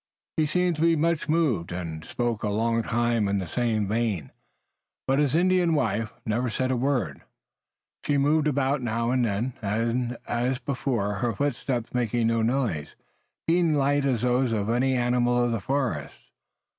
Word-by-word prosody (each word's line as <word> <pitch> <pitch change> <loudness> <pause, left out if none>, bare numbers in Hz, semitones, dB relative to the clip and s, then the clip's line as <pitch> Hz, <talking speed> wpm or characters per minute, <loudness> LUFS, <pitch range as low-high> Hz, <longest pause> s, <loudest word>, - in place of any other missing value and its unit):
He 155 -1 +2
seemed 180 +1 +1
to - - -3
be 165 0 +4
much 165 0 0
moved, 140 - +1
and 85 -3 -5
spoke 120 -3 -2
a 105 - -1
long 115 +2 +1
time 115 -2 +1
in 100 0 +1
the 95 - -2
same 110 +3 0
vein, 105 - -1 0.7
but 135 +1 +2
his 145 -1 +2
Indian 180 -1 +3
wife 110 -5 0
never 120 +3 0
said 130 +4 -1
a - - +1
word. 120 - -1 0.8
She 145 -1 +1
moved 150 +2 +3
about 140 -1 +1
now 115 0 -1
and 130 -1 +2
then, 115 +3 -1
and, 115 +4 -1
as 125 +2 0
before, 125 -6 -2
her 120 +3 0
footsteps 125 -2 -2
making 120 -1 0
no 115 0 +2
noise, 115 - -1 0.5
being 170 -1 +3
as - - +2
light 140 0 +2
as 125 -4 0
those 125 0 +2
of 110 -1 0
any 130 +2 +2
animal 120 0 +2
of 120 - +1
the 115 -3 -1
forest. 135 +4 -2
120 Hz, 170 wpm, -26 LUFS, 115-140 Hz, 0.8 s, be